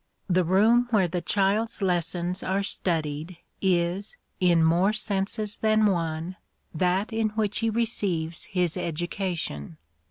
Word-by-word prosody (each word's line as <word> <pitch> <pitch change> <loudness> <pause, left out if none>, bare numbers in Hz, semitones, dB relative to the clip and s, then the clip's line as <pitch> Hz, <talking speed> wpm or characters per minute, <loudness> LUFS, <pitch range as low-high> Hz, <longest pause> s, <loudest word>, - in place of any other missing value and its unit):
The 185 -1 +3
room 220 +8 +4
where 205 -6 +3
the 175 +1 -3
child's 210 +5 +1
lessons 175 0 0
are 195 +2 0
studied 160 -3 -2 0.2
is, 185 +2 0 0.2
in 175 -3 +4
more 175 +6 +3
senses 205 0 -2
than 215 0 +3
one, 170 -2 -1 0.4
that 185 +6 0
in 220 -1 +1
which 210 -2 0
he 225 - +1
receives 200 -8 -1
his 180 -3 -1
education. 170 - -3
185 Hz, 125 wpm, -26 LUFS, 170-210 Hz, 0.4 s, room